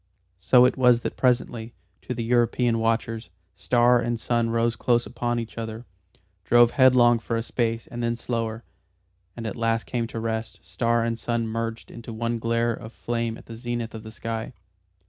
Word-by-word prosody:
So 125 +6 +6
it 125 - +1
was 125 -2 +5
that - - -4
presently, 120 -2 0 0.3
to 125 - -5
the 115 - -3
European 120 0 +2
watchers, 115 -1 -1 0.3
star 120 0 +3
and 120 -1 -1
sun 115 0 0
rose 115 0 +1
close 120 +2 +1
upon 120 0 -2
each 115 0 -5
other, 110 +1 -6 0.6
drove 120 +4 +5
headlong 125 -3 +5
for 115 +1 -3
a 115 - -1
space 115 -1 -1
and 120 - -7
then 115 0 0
slower, 115 -1 -3 0.7
and 115 - -5
at 110 - -3
last 115 -1 0
came 120 -2 -2
to 115 - -6
rest, 110 0 -3
star 115 -1 0
and 115 0 -2
sun 115 0 -1
merged 115 0 -4
into 115 0 -9
one 115 +1 -2
glare 115 +1 +1
of 115 0 -9
flame 115 -1 -3
at - - -15
the 115 - -9
zenith 120 -1 -4
of 110 - -7
the 110 0 -10
sky. 115 +2 -5
115 Hz, 185 wpm, -25 LUFS, 115-120 Hz, 0.7 s, So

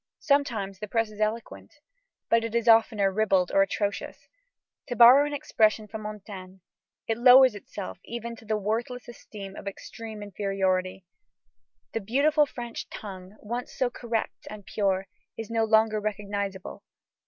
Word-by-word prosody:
Sometimes 235 -10 0
the 210 - -5
press 225 0 0
is 210 0 -9
eloquent, 215 +2 -3 0.5
but 230 0 +3
it 230 0 -4
is 235 0 0
oftener 220 -3 +4
ribald 190 -3 +2
or 195 - +5
atrocious. 200 +1 -2 0.6
To 245 - -3
borrow 250 +5 +8
an 295 - -5
expression 215 -5 +1
from 220 +1 -7
Montaigne, 195 -3 -9 0.4
"it 225 0 -2
lowers 255 0 +8
itself 205 -1 -8
even 235 0 -6
to 225 - -15
the 215 0 0
worthless 230 +4 -3
esteem 200 -4 -10
of - - -9
extreme 215 +2 -8
inferiority." 190 -2 -1 0.9
The 225 - -2
beautiful 290 +8 +3
French 240 -3 -7
tongue, 190 -1 -9
once 240 +3 -5
so 255 -2 +1
correct 230 -2 -4
and 210 -2 -10
pure, 195 -2 0 0.3
is 225 0 -6
no 225 -1 +2
longer 220 0 +3
recognizable. 200 -2 -4
215 Hz, 145 wpm, -27 LUFS, 200-235 Hz, 0.9 s, borrow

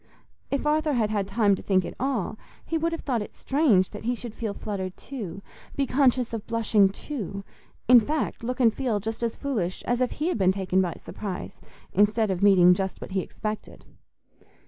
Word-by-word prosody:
If 280 +1 -1
Arthur 305 0 +2
had 220 -4 +1
had 200 -2 0
time 205 0 +3
to 190 - -2
think 185 -2 +2
at - - -6
all, 250 -5 -1 0.3
he 330 - -3
would 330 +1 +1
have 330 - -4
thought 245 -5 -1
it 205 - -8
strange 265 - +2
that 210 - -8
he 245 +1 +1
should 235 -2 -8
feel 220 -3 -4
fluttered 190 -3 -4
too, 200 -8 -7 0.3
be 280 - +1
conscious 255 -3 +2
of 225 -2 -5
blushing 220 -3 +3
too—in 215 - 0
fact, 290 +2 -2
look 250 +2 -3
and 230 -4 +5
feel 240 -6 -1
as 225 +1 -2
foolish 210 -11 -2
as 245 +1 0
if 250 - +1
he 310 +4 -1
had 295 - -1
been 190 -1 +4
taken 190 -1 +1
by 175 -3 -1
surprise 195 -4 -7 0.3
instead 210 +2 +3
of 185 -1 -2
meeting 185 -3 +7
just 190 +1 -3
what - - -8
he 190 - 0
expected. 215 +3 -6
220 Hz, 190 wpm, -26 LUFS, 195-255 Hz, 0.3 s, meeting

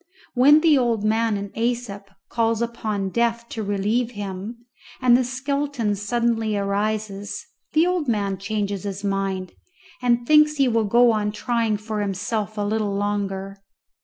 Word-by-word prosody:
When 285 +5 +6
the 310 -4 +5
old 235 -4 0
man 220 0 +1
in 200 0 -6
Æsop 230 -4 -3 0.2
calls 230 -1 0
upon 220 -4 -2
Death 235 +1 0
to 225 - -4
relieve 210 +4 0
him, 205 +3 -6 0.3
and 250 -2 +5
the 255 - +3
skeleton 270 -2 -1
suddenly 225 0 0
rises, 205 +4 -2 0.3
the 315 +3 +4
old 360 -4 0
man 200 -4 0
changes 205 -1 -2
his 200 0 -5
mind, 195 -2 -2 0.5
and 240 -1 +2
thinks 300 +2 +5
he 275 -2 +3
will 230 -2 +2
go 235 +3 +5
on 210 -1 0
trying 225 0 0
for 215 0 -4
himself 210 +2 -2
a - - -1
little 210 -1 -1
longer. 200 -1 -2
220 Hz, 150 wpm, -23 LUFS, 200-240 Hz, 0.5 s, When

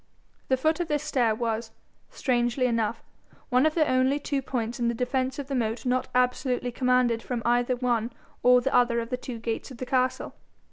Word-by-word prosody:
The 260 - +2
foot 315 +5 +1
of 345 - -1
this 295 -1 -1
stair 245 -7 +1
was, 225 0 -2 0.4
strangely 245 0 0
enough, 230 -2 0 0.5
one 255 +4 +4
of 310 - -2
the 310 -3 +3
only 255 +2 +2
two 285 -1 -2
points 240 -3 -3
in 235 - +1
the 235 - 0
defence 255 +2 -1
of 285 - -4
the 275 - -4
moat 230 -2 -1
not 255 0 0
absolutely 250 0 +1
commanded 250 -2 +2
from 240 -1 -4
either 245 +1 +2
one 240 -2 0 0.3
or 250 0 +6
the 270 - -1
other 240 -1 +3
of 230 +1 -5
the - - +1
two 250 -1 -7
gates 230 0 -4
of 260 - -10
the 255 - -5
castle. 255 0 0
250 Hz, 200 wpm, -26 LUFS, 235-260 Hz, 0.5 s, or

